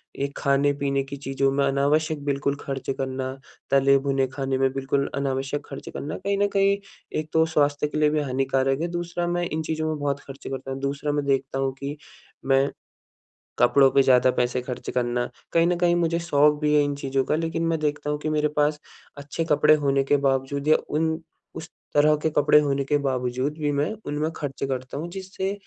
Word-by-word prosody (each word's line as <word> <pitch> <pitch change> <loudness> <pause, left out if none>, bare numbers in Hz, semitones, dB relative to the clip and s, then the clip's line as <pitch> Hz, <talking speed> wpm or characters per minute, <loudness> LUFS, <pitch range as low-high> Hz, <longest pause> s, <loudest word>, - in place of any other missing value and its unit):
एक 140 +1 -4
खाने-पीने 140 0 +1
की 140 +1 -8
चीज़ों 135 0 0
में 140 +1 +1
अनावश्यक 145 +2 +1
बिल्कुल 140 0 0
खर्च 135 -1 -5
करना 130 0 -3 0.4
तले-भुने 135 0 +3
खाने 135 0 -2
में 135 0 +2
बिल्कुल 135 +1 -1
अनावश्यक 140 +1 -2
खर्च 135 - -8
करना 150 +2 -5
कहीं 200 0 +1
न - - +3
कहीं 200 0 +4 0.4
एक 155 0 -5
तो 160 0 +4
स्वास्थ्य 145 -2 +1
के 150 - -5
लिए 150 -1 +4
भी 155 - +1
हानिकारक 135 +1 0
है 170 - 0
दूसरा 175 0 -3
मैं 175 0 0
इन 160 +1 -2
चीज़ों 155 0 -2
में 155 - -1
बहुत 145 -1 -1
खर्चे 135 -1 -10
करता 135 0 -5
हूँ। 135 - -4
दूसरा 140 +1 -2
मैं 145 -1 -1
देखता 135 -1 0
हूँ 135 -1 0
कि, 140 +2 -5 0.5
मैं 135 +1 +3 0.9
कपड़ों 135 +2 +5
पे 140 - +5
ज़्यादा 130 -1 +5
पैसे 125 +1 +1
खर्च 125 0 -6
करना 120 0 0 0.3
कहीं 165 0 +4
न 180 - +2
कहीं 175 -1 +3
मुझे 170 -1 +1
शौक 150 -3 +4
भी 150 0 +2
है 150 - +5
इन 145 0 -1
चीज़ों 135 -1 -1
का - - +1
लेकिन 165 +1 -2
मैं 165 -1 +1
देखता 150 -1 -2
हूँ 150 - 0
कि 155 - -3
मेरे 150 0 +1
पास 150 0 +2 0.4
अच्छे 145 +3 -4
कपड़े 150 +1 +5
होने 135 0 +2
के 145 +1 +2
बावजूद 140 +1 -1
या 155 - +6
उन 160 +2 +1 0.5
उस 160 - -7 0.2
तरह 150 +1 +5
के 160 - +3
कपड़े 150 +1 +6
होने 140 -2 0
के 145 +1 +2
बावजूद 130 +1 -2
भी 145 -1 0
मैं 145 +6 0
उनमें 150 +2 -2
खर्चे 140 -2 -4
करता 130 0 -4
हूँ। 165 +4 -4
जिससे 190 0 -4
140 Hz, 200 wpm, -24 LUFS, 135-150 Hz, 0.9 s, या